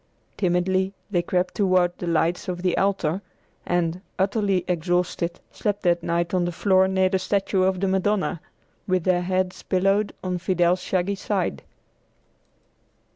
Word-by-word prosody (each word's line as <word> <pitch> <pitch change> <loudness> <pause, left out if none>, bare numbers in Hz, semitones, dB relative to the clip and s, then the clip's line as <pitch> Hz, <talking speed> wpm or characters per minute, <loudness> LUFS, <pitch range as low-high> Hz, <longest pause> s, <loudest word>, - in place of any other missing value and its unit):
Timidly 185 +1 +1 0.2
they 175 -3 +2
crept 180 +1 -1
toward 185 -3 +2
the 175 - -4
lights 170 +1 +1
of 180 -1 -4
the 180 -2 +2
altar, 190 -3 0 0.5
and, 175 0 0 0.2
utterly 195 -2 +1
exhausted, 175 0 -1
slept 205 -1 -2
that 175 -1 +2
night 170 +1 -1
on 180 -1 +2
the 175 - -1
floor 190 +1 +3
near 190 0 +2
the 190 0 0
statue 195 0 0
of 185 0 +2
the 195 - 0
Madonna, 190 -2 0 0.5
with 185 -2 +1
their 180 -1 +2
heads 185 0 -1
pillowed 195 +2 +1
on 180 -1 -2
Fidel's 175 0 +2
shaggy 185 +1 0
side. 195 -1 -2
185 Hz, 145 wpm, -24 LUFS, 175-190 Hz, 0.5 s, floor